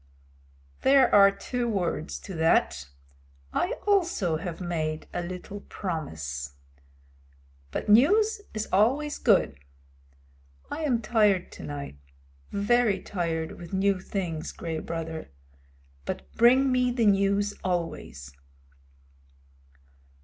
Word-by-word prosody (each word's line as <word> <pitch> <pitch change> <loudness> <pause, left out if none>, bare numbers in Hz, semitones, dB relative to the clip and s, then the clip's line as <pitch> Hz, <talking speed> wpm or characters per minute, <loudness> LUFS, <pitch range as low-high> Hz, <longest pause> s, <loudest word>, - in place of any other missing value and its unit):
"There 270 -2 +5
are 200 -1 +8
two 240 +5 -3
words 175 -6 -2
to 195 - -8
that. 75 - +1 0.6
I - - 0
also 345 - +2
have 165 0 -6
made 160 -3 -3
a - - -2
little 180 +3 -7
promise. 80 - -5 1.1
But - - -4
news 410 - +4
is 215 0 -4
always 265 +10 +2
good. 185 - +3 1.1
I 315 - -3
am 240 -5 +1
tired 210 -5 +2
to - - -10
night, 140 - -6 0.5
very 210 +1 +2
tired 165 -4 -3
with 175 +1 -10
new 195 0 +2
things, 175 -5 -4
Gray 165 -2 -4
Brother, 160 -1 -5 0.8
but 65 0 -6
bring 260 +3 +5
me 250 0 +2
the 240 -2 +1
news 200 0 +2
always." 120 - -4
190 Hz, 105 wpm, -27 LUFS, 160-230 Hz, 1.1 s, are